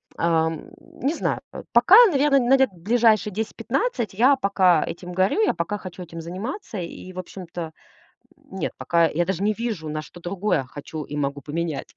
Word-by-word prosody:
Ам, 160 -1 0
не 275 +4 -4
знаю. - - -2
По - - -8
пока, 240 - +7
наверно, 285 -5 +3
на 250 +1 +4
лет 265 0 +3
ближайшие 215 +2 +2
10-15, 225 - -2
я 255 +8 +5
пока 190 -8 +3
этим 180 +1 -7
горю, 190 - +2
я 430 - +3
пока 180 +5 -3
хочу 185 -2 -9
этим 165 -1 -8
заниматься. 215 - -6
И 180 +1 -7
в 185 - -6
общем-то 175 -3 -7 0.7
нет, 280 -10 -5
пока 170 -1 +2
я 170 +2 0
даже 190 +1 -2
не 210 +1 +2
вижу, 215 -8 -4
на 155 0 -3
что 175 - -13
другое 185 -3 -1
хочу 145 +4 -8
и 145 - -7
могу 140 0 -2
поменять, 155 -1 -4
185 Hz, 175 wpm, -23 LUFS, 165-235 Hz, 0.7 s, пока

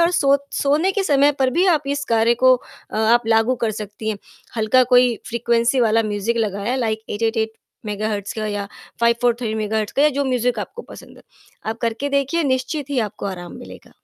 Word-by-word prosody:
और 335 +1 +4
सो 280 -5 +3 0.3
सोने 305 +7 +2
के 400 - 0
समय 285 -2 +4
पर 260 -1 +2
भी 350 +8 +2
आप 325 -5 +3
इस 285 0 -2
कार्य 230 +1 +3
को 255 0 +8 0.4
अ, - - -5
आप 230 +2 +3
लागू 225 +2 +3
कर 225 - +1
सकती 210 0 -6
हैं, 210 - -4 0.4
हल्का 220 +4 +4
कोई 245 -1 +5
फ्रीक्वेंसी 235 +2 +1
वाला 225 -1 +3
म्यूज़िक 210 +2 -2
लगाया 210 +2 -1
लाइक 220 -3 -1
8-8-8 225 +1 -1 0.3
मेगाहर्ट्ज़ 210 -1 -3
का 215 - -2
या 205 -1 -3 0.3
5-4-3 235 -1 +1
मेगाहर्ट्ज़ 215 -1 -2
का 280 - +4
या 300 - +6
जो - - +1
म्यूज़िक 250 -2 0
आपको 475 - -6
पसंद - - -13
है, - - -16 0.4
आप 225 +1 -3
करके 230 +4 -1
देखिए 280 +5 0
निश्चित 265 +2 -1
ही 280 - 0
आपको 210 - -7
आराम 175 -3 -7
मिलेगा। - - -12
235 Hz, 190 wpm, -21 LUFS, 220-265 Hz, 0.4 s, को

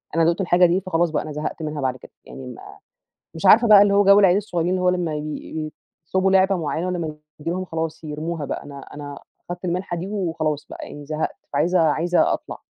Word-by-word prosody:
أنا 165 - +3
دُقت 170 +4 +1
الحاجة 180 -1 +4
دي، 175 +3 +2
فخلاص 175 -2 0
بقى - - -1
أنا 155 - -7
زهقت 150 +2 -4
منها، 150 -2 -4
بعد 130 -1 -1
كده - - -15
يعني 130 - -9
ما 125 - -9 0.7
مش 165 +4 -2
عارفة 230 +4 +7
بقى 205 -1 +9
اللي 200 -1 +3
هو 205 0 +5
جَو 200 +1 +7
العيال 185 -2 +5
الصغيّرين، 180 -4 -1
اللي 185 - 0
هو 180 - +3
لما 175 -4 0
ي 155 +1 -5 0.4
يطلبوا 190 +2 +2
لعبة 190 0 +4
معيّنة 165 +1 -2
ولما 165 -4 -3 0.2
تيجي 155 +2 -4
لهم، 185 +2 -2
خلاص 160 -1 -4
يرموها 155 +1 -4
بقى. - - -5
أنا 140 -1 -9 0.2
أنا 145 -1 -7 0.3
خدْت 175 +1 -6
المِنحة 180 0 -2
دي 180 +3 -5
وخلاص 165 -7 -2
بقى، - - -8
يعني 145 0 -9
زهقت 155 +1 -3 0.2
فعايزة 180 +1 +2
عايزة 165 +3 +2
أطلَع. - - -6
170 Hz, 215 wpm, -22 LUFS, 155-185 Hz, 0.7 s, بقى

